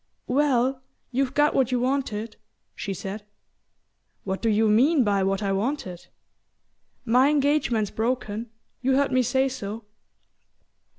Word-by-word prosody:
"Well, 260 -1 +1 0.3
you've 265 +1 -1
got 295 +1 +3
what 260 -2 +1
you 250 - +1
wanted," 240 -4 -2 0.4
she 200 - -5
said. 195 +3 -6 1.0
"What 190 0 -3
do 230 - +1
you 220 +1 +3
mean 260 +7 +4
by 200 -2 +1
what 195 +2 0
I 200 - 0
wanted?" 195 -3 -3 1.0
"My 250 +4 +4
engagement's 280 -8 +1
broken 225 -1 -2 0.3
you 260 +1 +2
heard 280 +1 +2
me 255 - +3
say 265 +2 +1
so." 225 -4 -6
245 Hz, 130 wpm, -25 LUFS, 210-270 Hz, 1.0 s, mean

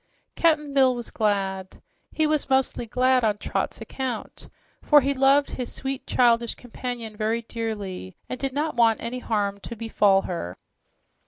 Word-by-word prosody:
Cap'n 300 -4 +2
Bill 260 -2 +4
was 240 -1 -6
glad. 195 -3 -1 0.3
He 315 - +1
was 305 -2 0
mostly 265 -3 +1
glad 255 +2 +2
on 210 -2 +2
Trot's - - -3
account, 255 -4 -5 0.3
for 295 -1 +6
he 275 +2 +1
loved 275 +1 +3
his 250 - -4
sweet, 270 -1 -4
childish 235 -1 +3
companion 245 -2 -6
very 220 +2 -1
dearly, 205 - -5
and 255 - -5
did 270 -1 -1
not 295 +2 -2
want 230 -2 +4
any 240 +2 -4
harm 205 -4 -1
to 235 - -8
befall 205 -3 +3
her. 90 - -5
235 Hz, 155 wpm, -25 LUFS, 215-265 Hz, 0.3 s, for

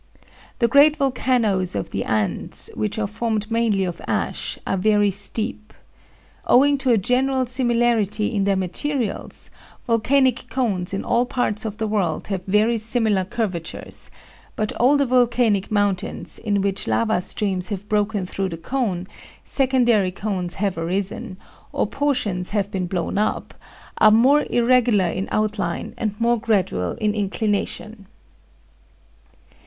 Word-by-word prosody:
The 235 - +3
great 285 +5 +5
volcanoes 245 - +1
of 100 - -3
the 95 - -2
Andes, 110 -2 -2
which 105 - -3
are 220 - 0
formed 220 +1 -2
mainly 225 -4 +2
of 175 -2 -4
ash, - - -2
are - - 0
very 205 +1 +3
steep. 215 +2 -5 0.7
Owing 280 +2 +5
to 265 -1 -1
a 235 - +5
general 255 +5 +1
similarity 240 -4 +1
in 200 -2 +1
their 200 -1 +2
materials, 210 - -3 0.3
volcanic 255 +2 +2
cones 205 -9 -1
in 195 - -3
all 240 +1 +2
parts 230 -5 -1
of 215 -1 -4
the 220 - -1
world 200 -7 -1
have 190 -3 -2
very 215 +4 +2
similar 220 -3 +1
curvatures; 185 -4 -5 0.5
but 215 0 -2
older 280 +3 +4
volcanic 240 -5 +2
mountains, 205 -3 -1
in 205 -3 0
which 195 0 -2
lava 220 -5 +1
streams 185 -1 -2
have 205 -1 -5
broken 210 -2 0
through 190 +1 -3
the 165 - -6
cone, 190 -2 -2 0.4
secondary 245 -7 +2
cones 185 -2 -3
have 195 -4 -1
arisen, 185 +2 -3 0.3
or - - 0
portions 225 -11 -1
have 200 -1 -1
been 185 -2 -2
blown 185 +2 -2
up, 215 - -1 0.5
are 215 - +7
more 260 +7 +4
irregular 240 -4 +3
in 190 +2 -3
outline 210 -5 -1
and 210 -2 -3
more 235 0 +2
gradual 185 - 0
in 210 -1 -1
inclination. 205 0 -2
215 Hz, 140 wpm, -22 LUFS, 195-240 Hz, 0.7 s, are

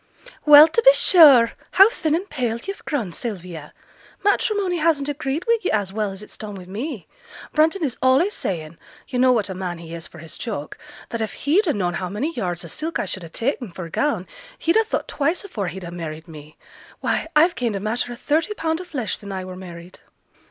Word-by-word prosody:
'Well, 295 +1 +10
to 330 +9 +1
be - - +8
sure! 290 - +7 0.2
how 390 +1 +8
thin 315 -8 0
and 370 +4 -3
pale 245 - -2
yo've 390 +12 -7
grown, 240 - -2
Sylvia! 175 -7 -6 0.5
Matrimony 405 -2 +1
hasn't 305 -3 +1
agreed 290 +2 -3
wi' 465 0 +3
yo' 370 - -1
as 200 -3 -1
well 210 -1 -1
as 195 +2 -9
it's - - -13
done 210 -2 -6
wi 185 -2 -9
me. 225 - -5 0.5
Brunton 320 +4 +2
is 265 -5 -2
allays 270 +11 +3
saying 165 -3 -4 0.3
(yo' 250 - -3
know 255 0 +5
what 225 -5 +1
a 190 - -4
man 180 -2 -4
he 165 0 -10
is 170 0 -6
for - - -15
his 165 -1 -9
joke) 200 - -6 0.3
that 230 - -4
if 220 - -3
he'd 355 +9 +3
ha' 310 - +1
known 180 -3 -1
how 180 +1 -3
many 255 - -3
yards 175 - -3
o' - - -7
silk 320 +2 -4
I - - -2
should 190 - -4
ha' 165 - -10
ta'en 245 - -2
for 180 - -6
a 165 - -11
gown, 230 - 0 0.3
he'd 335 - +1
ha' 445 -1 +2
thought - - -2
twice 320 +7 -1
afore 210 - -4
he'd 185 +2 -6
ha' 170 - -7
married 160 -1 -7
me. 155 -1 -12 0.4
Why, - - -1
I've 330 +4 +5
gained 235 -7 -2
a - - -2
matter 225 +4 -2
o' - - -6
thirty 315 - 0
pound 320 -1 -1
o' - - -9
flesh 265 -10 -3
sin' 200 -2 -9
I 190 -1 -4
were 185 0 -8
married!' 175 -1 -11
235 Hz, 225 wpm, -22 LUFS, -, 0.5 s, Well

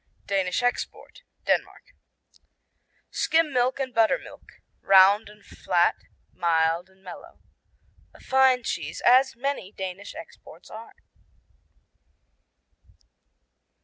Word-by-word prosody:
Danish 195 +2 -1
Export 245 - -3 0.2
Denmark - - -2 1.2
Skim 320 -3 +1
milk 250 +2 +1
and 260 -2 -3
buttermilk. 225 - -1 0.3
Round 195 +2 +5
and 210 0 -18
flat, 175 -1 +1 0.4
mild 170 +1 0
and 190 0 -27
mellow. 180 -2 -12 0.8
A - - -16
fine 260 -1 +3
cheese, - - -5
as 260 +1 +5
many 255 -6 -4
Danish 190 0 -7
exports 165 +1 -13
are. 225 +1 -11
210 Hz, 90 wpm, -25 LUFS, 185-255 Hz, 1.2 s, Round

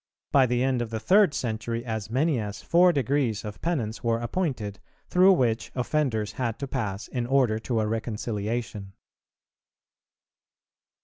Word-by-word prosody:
By 135 -2 +5
the 125 +1 +1
end 130 -2 +1
of 120 - -3
the 110 0 -3
third 190 - +4
century 115 0 -3
as 110 -3 -4
many 135 +3 +1
as 105 -2 -5
four 180 +1 +5
degrees 135 -6 0
of 105 -1 -7
penance 125 -11 -2
were 115 -1 +2
appointed, 120 - -3 0.3
through 185 +2 +6
which 120 -8 0
offenders 125 -5 0
had 120 -4 -3
to 140 - -5
pass 105 -7 -3
in 120 -2 -3
order 125 -5 +2
to 115 0 -1
a 110 - +1
reconciliation. 110 -2 -3
120 Hz, 145 wpm, -26 LUFS, 110-135 Hz, 0.3 s, through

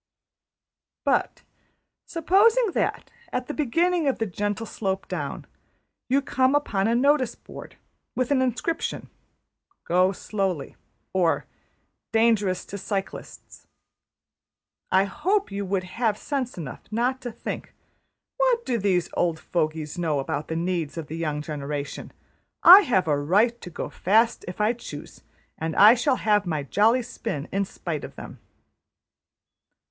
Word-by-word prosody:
But - - 0 0.6
supposing 410 +7 +3
that, - - -2 0.2
at 250 - -2
the 295 - -5
beginning 330 +4 +1
of 270 - +1
the 225 - -1
gentle 205 +3 -3
slope 195 -3 -3
down, - - -4 0.6
you 275 +2 +2
come 260 0 +2
upon 205 -9 +1
a 230 - +2
notice 275 +1 +2
board - - -12 0.4
with 255 +1 -1
an 270 -2 +3
inscription 260 +6 -2 0.8
``Go 185 +2 +3
slowly,'' 190 -10 -3 0.4
or 180 -3 +1 0.7
``Dangerous 220 -5 +2
to 200 - -6
cyclists,'' 195 0 -6 1.2
I 190 +1 +5
hope 360 - 0
you 200 0 -3
would 190 0 -1
have 215 +3 -1
sense 265 -5 -3
enough 145 -8 -7
not 245 +4 0
to 245 - -5
think 225 - -7 0.7
``What - - +2
do 235 -2 0
those 185 -3 +1
old 170 -2 +1
fogies 155 0 -2
know 160 -4 0
about 145 +1 -3
the 160 - -3
needs 170 -2 -2
of 160 -3 -6
the 160 - -5
young 150 -3 -2
generation? 145 -1 -5 0.5
I 370 +4 +11
have 190 -8 +2
a 145 -2 +2
right 210 +11 +2
to - - -8
go 170 - -6
fast 225 +5 +2
if 180 - -7
I 210 +3 +3
choose, 155 -11 -10 0.4
and 160 0 -3
I 210 +3 +9
shall 255 +2 +1
have 210 -5 +1
my 155 -4 -1
jolly 225 - +3
spin 190 - -5
in 200 0 0
spite 170 -5 -5
of - - -9
them.'' - - -10
205 Hz, 140 wpm, -25 LUFS, 170-250 Hz, 1.2 s, I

